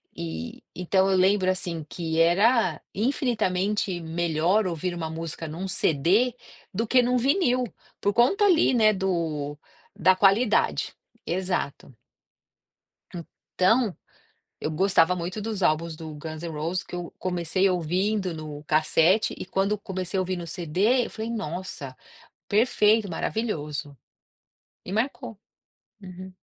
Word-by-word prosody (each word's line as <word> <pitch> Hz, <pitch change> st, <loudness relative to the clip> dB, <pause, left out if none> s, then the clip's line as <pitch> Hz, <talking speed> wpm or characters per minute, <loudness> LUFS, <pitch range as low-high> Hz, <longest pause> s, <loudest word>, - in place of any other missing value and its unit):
E, 80 Hz, 0 st, -6 dB
então 190 Hz, +2 st, +2 dB
eu 190 Hz, -, +3 dB
lembro, 190 Hz, 0 st, +3 dB
assim, 175 Hz, -4 st, -2 dB
que 165 Hz, -2 st, -3 dB
era 185 Hz, -, +3 dB
infinitamente 210 Hz, -6 st, 0 dB
melhor 170 Hz, +4 st, +1 dB
ouvir 175 Hz, +1 st, -3 dB
uma 165 Hz, -2 st, -4 dB
música 165 Hz, 0 st, -6 dB
num 175 Hz, +5 st, -5 dB
CD 190 Hz, -, +2 dB, 0.4 s
do 225 Hz, +5 st, -1 dB
que 250 Hz, +1 st, +5 dB
num 250 Hz, +1 st, +1 dB
vinil, 255 Hz, -2 st, +2 dB, 0.3 s
por 205 Hz, -, +1 dB
conta 390 Hz, -, +4 dB
ali, 340 Hz, -8 st, +4 dB
né, 215 Hz, -3 st, +5 dB
do 165 Hz, -6 st, -2 dB, 0.4 s
da 185 Hz, +2 st, +4 dB
qualidade. 205 Hz, +4 st, +2 dB, 0.3 s
Exato. 180 Hz, -7 st, -3 dB, 1.6 s
Então, 215 Hz, +2 st, +3 dB, 0.6 s
eu 155 Hz, -, -2 dB
gostava 180 Hz, 0 st, +3 dB
muito 180 Hz, +4 st, -4 dB
dos 210 Hz, -3 st, -4 dB
álbuns 160 Hz, +1 st, +1 dB
do 155 Hz, -1 st, -8 dB
Guns 155 Hz, +1 st, -7 dB
N' 170 Hz, -, -4 dB
Roses 165 Hz, +5 st, -2 dB
que -, -, -11 dB
eu 175 Hz, -1 st, -5 dB
comecei 180 Hz, +1 st, 0 dB
ouvindo 185 Hz, +2 st, 0 dB
no 150 Hz, -2 st, -8 dB
cassete 160 Hz, +6 st, +3 dB
e -, -, -6 dB
quando 195 Hz, +2 st, 0 dB
comecei 190 Hz, -1 st, -4 dB
a -, -, +3 dB
ouvir 185 Hz, 0 st, -2 dB
no 175 Hz, -1 st, -6 dB
CD 190 Hz, +9 st, +1 dB
eu -, -, -10 dB
falei, 220 Hz, +1 st, -5 dB
nossa, 175 Hz, -, -5 dB, 0.5 s
perfeito, 215 Hz, -2 st, +3 dB
maravilhoso. 150 Hz, -9 st, -3 dB, 0.9 s
E 185 Hz, -, -7 dB
marcou. 240 Hz, 0 st, -2 dB, 0.6 s
Uhum. 185 Hz, 0 st, -10 dB
185 Hz, 130 wpm, -25 LUFS, 165-210 Hz, 1.6 s, que